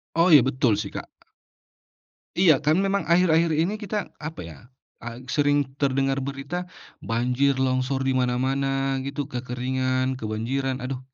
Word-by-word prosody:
Oh 170 +2 +4
iya 145 - +9
betul 130 -4 +2
sih 100 -1 -3
Kak. - - -5 1.4
Iya 170 -5 +7
kan 155 - +4
memang 200 0 0
akhir-akhir 170 -2 +3
ini 185 +6 0
kita 210 +1 -3 0.3
apa 160 - -7
ya, 80 - -11 0.5
eee, 115 0 -6 0.2
sering 145 -1 +3 0.2
terdengar 135 0 +1
berita, 140 +5 -5 0.5
banjir 125 +4 +2
longsor 130 +1 0
di - - +2
mana-mana 130 +2 0 0.4
gitu 140 +1 -3
kekeringan 130 +1 -1
kebanjiran 125 +5 -2
aduh, 130 0 -4
135 Hz, 135 wpm, -24 LUFS, 125-145 Hz, 1.4 s, iya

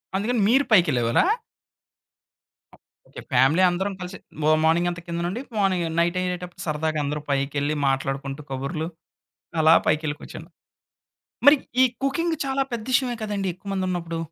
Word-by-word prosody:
అందుకని 220 +4 0
మీరు 270 +3 +4
పైకెళ్ళేవారా? 125 - +4 1.8
Okay. - - -9
Family 135 +8 +4
అందరం 190 +3 -2
కలిసి 180 +2 -6 0.3
మ 155 - +5
మార్నింగ్ 170 +2 +3
అంతా 170 -1 -6
కిందన 170 0 -3
ఉండి 220 +7 -4 0.2
మార్నింగ్ 185 -4 +1
నైట్ 170 +2 +1
అయ్యేటప్పుడు 180 -1 -4
సరదాగా 155 0 -1
అందరూ 150 +1 -2
పైకెళ్ళి 140 +2 0
మాట్లాడుకుంటూ, 135 +1 -2
కబుర్లు 145 +5 -3 0.7
అలా 160 +1 +7
పైకెళ్లి 155 -1 +1
కూర్చున్నా 165 +3 -10 1.0
మరి 290 +1 +9 0.3
ఈ - - +8 0.2
కుకింగ్ 320 +5 0
చాలా 270 0 0
పెద్ద 225 -2 -3
విషయమే 255 -2 +2
కదండీ! 200 -3 -2
ఎక్కువ 195 +3 -13
మంది 190 -1 -1
ఉన్నప్పుడు. 170 -2 -3
170 Hz, 140 wpm, -24 LUFS, 150-200 Hz, 1.8 s, మరి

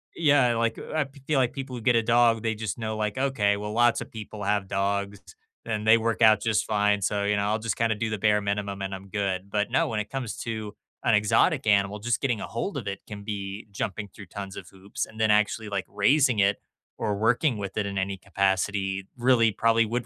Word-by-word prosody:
Yeah, 140 -7 +4
like, 115 0 0
I 155 -2 -2 0.2
feel 150 -3 +2
like 125 -2 +1
people 135 -2 -6
who 120 - -6
get 120 +1 +3
a 115 - +3
dog, 115 -1 +3
they 110 0 0
just 110 0 -4
know 110 -1 -3
like, 105 +2 -2
"Okay, 115 -7 +1
well 105 +1 -5
lots 120 0 +3
of - - -8
people 105 -2 -8
have 100 -1 0
dogs 100 +1 -1 0.4
and 110 -1 -3
they 110 - +8
work 115 +1 -1
out 110 -2 +6
just 110 -1 +1
fine, 105 -1 +1
so, 100 +1 0
you 105 0 +1
know, 100 - 0
I'll 110 +2 0
just 115 0 -3
kinda 115 -1 +1
do 110 +1 -2
the 110 - -2
bare 105 +1 +2
minimum 100 -1 -3
and 95 0 -3
I'm 95 +1 -11
good." 100 -2 -2
But 105 0 -1
no, - - +2
when 110 -2 -2
it 105 - -8
comes 130 -5 -4
to 110 -2 -5 0.3
an - - +4
exotic 130 - +2
animal, 100 0 +2
just 120 +3 0
getting 120 -6 0
ahold - - -4
of - - -5
it 100 -1 -3
can 100 -1 -8
be 100 0 -5
jumping 100 +1 -4
through 105 - -12
tons 100 +1 -7
of 90 - -8
hoops 95 +1 -5
and 110 - -14
then 110 -1 +4
actually, 105 +1 +1
like, 100 -2 -2
raising 125 +4 +3
it 100 0 +3 0.4
or 105 -1 -1
working 115 +4 +2
with 100 0 -6
it 105 - 0
in 100 0 -4
any 95 0 -1
capacity 95 0 -1
really 120 -2 +4
probably 115 +2 +3
would 120 +2 -2
105 Hz, 230 wpm, -26 LUFS, 100-115 Hz, 0.4 s, they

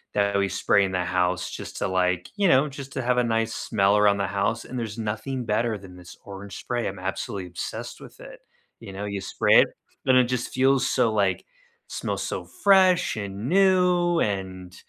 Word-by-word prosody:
that 100 -1 +1
we 100 - 0
spray 100 +1 +2
in 95 - -1
the 90 -1 -1
house 90 0 0
just - - -8
to - - -1
like 90 -1 0
you 200 - +3
know, 140 -2 +4
just 140 -1 -9
to 130 - -3
have 125 0 +1
a - - +2
nice 115 -1 0
smell 100 -1 +1
around 105 -1 +4
the 100 - -1
house, 100 +4 -1
and 125 -1 -6
there's 110 -1 -5
nothing 115 +4 -4
better 110 +1 0
than 95 -2 -13
this 90 -1 -13
orange 100 0 -9
spray, 120 -1 -3
I'm 95 - -5
absolutely 95 0 -4
obsessed 85 -1 -7
with - - -14
it. - - -12 0.4
You 95 - -10
know, 100 +2 -5
you 100 -1 -4
spray 95 - +3
it, - - +2 0.4
and 130 -1 +5
it 125 - +6
just 125 0 -3
feels 135 +1 +2
so 120 -4 +2
like 100 -3 0 0.4
smells - - -4
so - - -4 0.2
fresh 185 - +4
and 100 +2 -5
new, 180 -2 +3
and, 95 -3 -3
105 Hz, 200 wpm, -25 LUFS, 95-130 Hz, 0.4 s, it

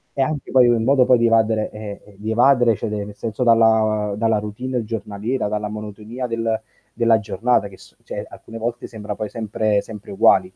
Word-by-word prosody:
È 135 - 0
anche 145 0 -2
poi 125 -2 +6
in 115 -2 +2
modo 130 0 +4
poi 125 - +5
di 115 - +2
evadere 110 -1 +2
eh, 105 -1 -9
di 110 +2 -4
evadere 120 -1 +4
cioè 100 - -4
nel 105 -1 -5
senso 115 +3 -3
dalla 110 -2 +3
dalla 110 -1 +2
routine 120 +4 -4
giornaliera, 110 +2 -3
dalla 105 0 -2
monotonia 110 +4 -6
del 115 -1 -1 0.3
della 115 -1 +3
giornata 115 0 0
che 95 - -14
s - - -18
cioè - - -5
alcune 115 0 -10
volte 120 +1 -3
sembra 105 -2 -6
poi 105 -1 -4
sempre 110 -2 0
sempre 105 -2 -10
uguali. 95 -1 +5
110 Hz, 190 wpm, -21 LUFS, 105-120 Hz, 0.3 s, poi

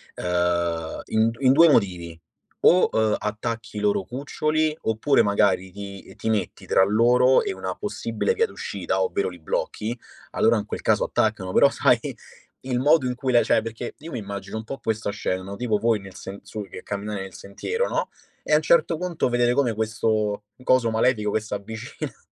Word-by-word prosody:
ehm, 85 -2 -1
in 110 +1 +2
d 115 - -8
in 130 -1 +5
2 165 +3 +7
motivi, 90 - +1 0.4
o, 180 - +5
uhm, 110 -1 +2
attacchi 110 +1 -4
i - - -1
loro 105 -2 +1
cuccioli 155 - -1
oppure 110 +6 +2
magari 95 -2 +2
ti 100 0 -9
ti 110 - -3
metti 105 -4 -2
tra 95 - +4
loro 120 +5 +4
e 400 - -2
una - - -4
possibile 465 - -2
via 460 +1 +2
d'uscita - - -3
ovvero 450 -3 0
li - - -12
blocchi. - - -3 0.3
Allora - - +3
in - - -3
quel - - -5
caso - - +2
attaccano, 100 -4 -1
però 140 - +6
sai 125 -4 +3 0.7
il 125 -1 -1
modo 145 +1 +4
in 125 - -2
cui 130 +1 -2
la 120 - +5
cioè, - - +3
perché 115 +1 -6
io 165 +3 -9
mi 125 - -3
immagino 100 0 -6
un 110 - -5
po' 135 - -6
questa 110 -2 -2
scena, 95 -2 -2
no, 100 +1 -7
tipo 110 -2 0
voi 115 -1 +1
nel 95 -1 -12
sen 100 +1 -8
su 105 0 -7
che - - -9
camminate 100 0 -4
nel 95 -2 -8
sentiero, 455 - -3
no, - - -1 0.3
e - - -1
a - - +8
un 155 - +4
certo 165 +1 +3
punto 175 -5 -1
vedere 120 0 +2
come 130 -5 +2
questo 110 -1 -1 0.2
coso 125 -3 +3
malefico 110 -2 +1
che 110 - +1
s'avvicina. 110 +1 -7
110 Hz, 190 wpm, -24 LUFS, 100-130 Hz, 0.7 s, a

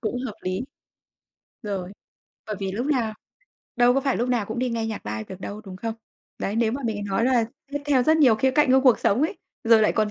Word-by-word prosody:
cũng 230 +2 -2
hợp 215 - -6
lý. 185 +1 -2 1.0
Rồi, 195 -3 -4 0.6
bởi 215 -2 -4
vì 190 -1 -2
lúc 240 +7 -2
nào 235 -7 0 0.6
đâu 245 0 +5
có 275 - +2
phải 270 -1 0
lúc 240 +2 -1
nào 235 -5 0
cũng 220 +2 -5
đi 250 -1 0
nghe 225 -1 -2
nhạc 215 - -5
live 110 +1 -4
được 190 0 -9
đâu, 205 +2 -6
đúng 185 -1 -8
không? 225 +3 -4 0.4
Đấy, 205 +3 -2
nếu 230 -1 +2
mà 275 +1 -4
mình 205 -3 -2
nói 195 +3 0
là 250 -3 +3 0.3
tiếp 290 0 -3
theo 270 -4 +3
rất 315 +4 +4
nhiều 260 -8 +6
khía 265 +5 +2
cạnh 285 -1 +3
của 265 - +6
cuộc 255 -4 +5
sống 230 +8 +2
ấy, 320 - 0 0.3
rồi 225 -1 +6
lại - - +3
còn 215 -1 +1
225 Hz, 245 wpm, -24 LUFS, 205-255 Hz, 1.0 s, nhiều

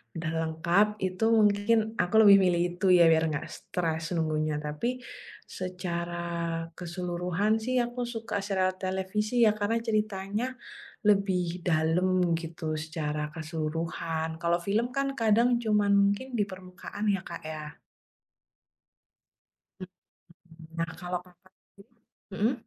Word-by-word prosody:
udah 165 -1 -3
lengkap, 170 +5 +2
itu 185 +2 -2
mungkin 210 +1 +4 0.2
aku 180 -1 -1
lebih 200 -2 +9
milih 175 -2 +3
itu 185 +1 +2
ya 175 -2 +7
biar 160 0 +4
nggak 150 - -3
stres 165 -1 -3
nunggunya. 155 -2 0
Tapi 155 +13 -3 0.5
secara 175 -2 -4 0.6
keseluruhan 180 +3 -1
sih 255 +2 +1
aku 240 +1 -2
suka 225 -4 -4
serial 185 -2 0
televisi 190 +5 -2
ya, 215 - +3
karena 215 +2 0
ceritanya 215 +3 -1 0.5
lebih 185 -4 +2
dalam 175 +2 +2
gitu 165 -1 -4
secara 155 -1 -3
keseluruhan. 160 0 -3
Kalau 170 +1 0
film 215 +7 0
kan 275 +1 0
kadang 230 +2 +3
cuman 210 -2 +2
mungkin 200 +5 +2
di 210 - +2
permukaan 185 +2 -7
ya, 190 - -6
Kak, 170 -3 -8
ya. 155 -1 -7 2.0
Mhm, 185 - -7 0.9
nah 165 0 -1
kalau 180 0 -2
Kakak 180 +1 -23
sendiri 210 +4 -23 0.4
mhm? 220 +6 +2
185 Hz, 120 wpm, -28 LUFS, 165-210 Hz, 2.0 s, lebih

